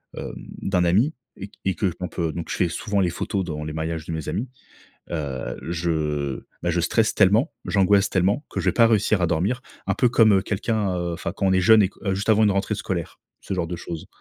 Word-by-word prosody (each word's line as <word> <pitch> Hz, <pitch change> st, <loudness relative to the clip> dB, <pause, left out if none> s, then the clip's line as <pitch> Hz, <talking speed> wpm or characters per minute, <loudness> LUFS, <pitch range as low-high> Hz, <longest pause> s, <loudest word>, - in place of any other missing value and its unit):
hem, -, -, -6 dB, 0.3 s
d'un 90 Hz, -2 st, +1 dB
ami 110 Hz, -, +3 dB, 0.2 s
et 100 Hz, -, -6 dB
q -, -, -25 dB
et 95 Hz, -, +1 dB
que 95 Hz, -5 st, 0 dB
on 90 Hz, -, -1 dB
peut 85 Hz, -3 st, -2 dB
donc 85 Hz, -, -5 dB
je -, -, -2 dB
fais 90 Hz, -, +2 dB
souvent 100 Hz, +3 st, -2 dB
les 90 Hz, -2 st, +2 dB
photos 95 Hz, +3 st, -2 dB
dans 75 Hz, -3 st, -4 dB
les 75 Hz, -, -5 dB
mariages 80 Hz, 0 st, -3 dB
de -, -, -6 dB
mes 80 Hz, -2 st, -4 dB
amis, 125 Hz, +5 st, -2 dB, 0.6 s
heu, 70 Hz, -6 st, -3 dB
je 75 Hz, -5 st, -1 dB, 0.2 s
bah 85 Hz, -, +1 dB
je 85 Hz, 0 st, +1 dB
stresse 110 Hz, +6 st, +1 dB
tellement, 105 Hz, +5 st, +4 dB
j'angoisse 100 Hz, 0 st, +3 dB
tellement 100 Hz, -, +1 dB
que -, -, -4 dB
je -, -, -5 dB
vais -, -, +4 dB
pas 115 Hz, -1 st, +5 dB
réussir 105 Hz, -2 st, +2 dB
à -, -, +4 dB
dormir. 100 Hz, +11 st, 0 dB, 0.2 s
Un -, -, +1 dB
peu 125 Hz, -, +3 dB
comme 110 Hz, -5 st, +5 dB
quelqu'un, 105 Hz, -2 st, -1 dB
heu, 85 Hz, -1 st, -2 dB
enfin 85 Hz, 0 st, -4 dB
quand 100 Hz, -, 0 dB
on 95 Hz, -, +3 dB
est 95 Hz, -, +3 dB
jeune 110 Hz, +3 st, +6 dB
et 95 Hz, -, +2 dB
que -, -, -24 dB
heu, 95 Hz, -, +2 dB
juste 100 Hz, +3 st, -4 dB
avant 110 Hz, 0 st, +5 dB
une 105 Hz, -, +4 dB
rentrée 100 Hz, +2 st, 0 dB
scolaire, 95 Hz, -6 st, -4 dB, 0.2 s
ce 95 Hz, -, -4 dB
genre 90 Hz, -2 st, -1 dB
de 90 Hz, -, -4 dB
choses. 85 Hz, -1 st, -7 dB
95 Hz, 245 wpm, -23 LUFS, 85-105 Hz, 0.6 s, jeune